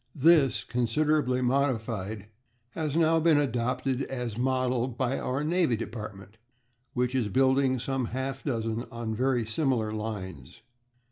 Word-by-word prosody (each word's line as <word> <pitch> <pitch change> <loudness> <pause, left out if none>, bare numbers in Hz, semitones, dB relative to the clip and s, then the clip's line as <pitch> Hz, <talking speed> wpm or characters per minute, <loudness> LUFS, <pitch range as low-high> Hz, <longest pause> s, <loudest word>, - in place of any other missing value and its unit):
This, 135 -6 +4
considerably 125 +3 +1
modified, 115 -6 -1 0.5
has 155 0 -2
now 165 0 +4
been 160 -1 +4
adopted 130 0 0
as 125 -4 -4
model 130 0 +1
by 130 +1 -1
our 135 +3 -2
Navy 165 -5 +2
Department, 105 -2 -7 0.6
which 125 0 0
is 125 -5 +1
building 130 +3 +3
some 130 +1 -2
half 130 +2 -4
dozen 115 -3 -2
on 115 -1 -4
very 125 0 +1
similar 115 -3 0
lines. 100 - -6
125 Hz, 125 wpm, -28 LUFS, 115-135 Hz, 0.6 s, This